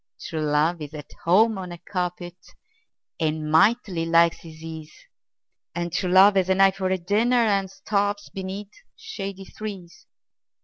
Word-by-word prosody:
True 160 -1 -5
love 155 +3 +1
is 150 +1 -7
at 150 -2 -10
home 210 +4 +4
on 180 -2 -7
a 175 - -7
carpet, 180 -1 -4 0.8
And 155 -1 -1
mightily 190 0 +3
likes 170 0 +4
his 160 -1 -13
ease 160 -1 -8 0.8
And 175 -1 -3
true 180 0 -1
love 195 +2 +7
has 190 -1 +2
an 190 0 +2
eye 195 0 +6
for 190 -1 -3
a 190 - +1
dinner, 210 +8 +1
And 200 -5 +2
starves 205 +1 -2
beneath 195 +2 -6 0.2
shady 195 - -7
trees. 195 -4 -9
185 Hz, 150 wpm, -24 LUFS, 165-200 Hz, 0.8 s, love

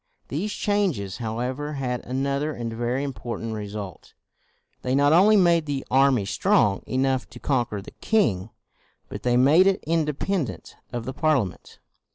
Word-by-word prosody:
These 185 +9 -2
changes, 185 - -1
however, 125 +6 -3
had 125 -3 -3
another 140 +4 -1
and 115 -3 -5
very 120 +4 -1
important 115 -4 -5
result. 105 -4 -7 0.7
They 130 +1 0
not 145 +2 +4
only 205 +5 +6
made 170 -4 +3
the 140 -2 -3
army 130 -5 +4
strong 100 0 +2
enough 130 0 0
to - - -12
conquer 120 -8 -1
the - - -11
king, 115 - 0 0.6
but - - -7
they 125 0 +2
made 150 +9 +6
it 195 -1 +1
independent 160 - -2 0.2
of 120 -1 -4
the 130 - -4
Parliament. 140 - -1
130 Hz, 145 wpm, -24 LUFS, 115-155 Hz, 0.7 s, only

